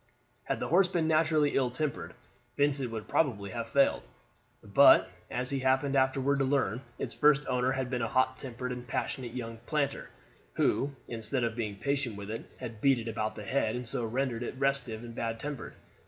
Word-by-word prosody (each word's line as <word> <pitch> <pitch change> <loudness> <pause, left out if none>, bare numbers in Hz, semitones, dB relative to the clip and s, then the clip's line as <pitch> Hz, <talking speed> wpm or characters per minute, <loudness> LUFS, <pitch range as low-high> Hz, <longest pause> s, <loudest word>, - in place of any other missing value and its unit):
Had - - -2
the - - -3
horse 180 +3 +5
been 170 -3 0
naturally 155 -2 +3
ill 130 -2 +1
tempered 140 +2 -3 0.4
Vincent 140 -3 +2
would 110 -2 -6
probably 105 -10 0
have 115 -1 -4
failed, 140 -1 +2 0.6
but, - - +6 0.2
as 125 +1 0
he 140 - 0
happened 130 +2 +2
afterward 135 +1 +2
to - - +3
learn, 130 -4 +1 0.2
its - - -3
first 150 -1 +4
owner 125 +1 +1
had 130 -2 -3
been 125 -2 -1
a 115 - 0
hot 130 +2 +1
tempered 125 -1 -5
and 125 -1 -6
passionate 125 -1 -3
young 115 -2 -5
planter, 145 -3 -1 0.4
who, 140 +1 +1
instead 115 +2 -1
of 115 -2 -1
being 110 -4 -3
patient 140 0 -1
with 100 +1 -7
it, 115 - -6
had 110 -2 -7
beat 135 -2 +4
it 115 -1 -5
about 110 -1 -2
the 105 - -8
head, 115 -3 0
and 125 -1 -4
so 120 - 0
rendered 120 +1 -1
it 120 - -4
restive 135 -5 0
and 120 -1 -8
bad 115 -1 -3
tempered. 145 -1 -6
130 Hz, 195 wpm, -30 LUFS, 115-140 Hz, 0.6 s, but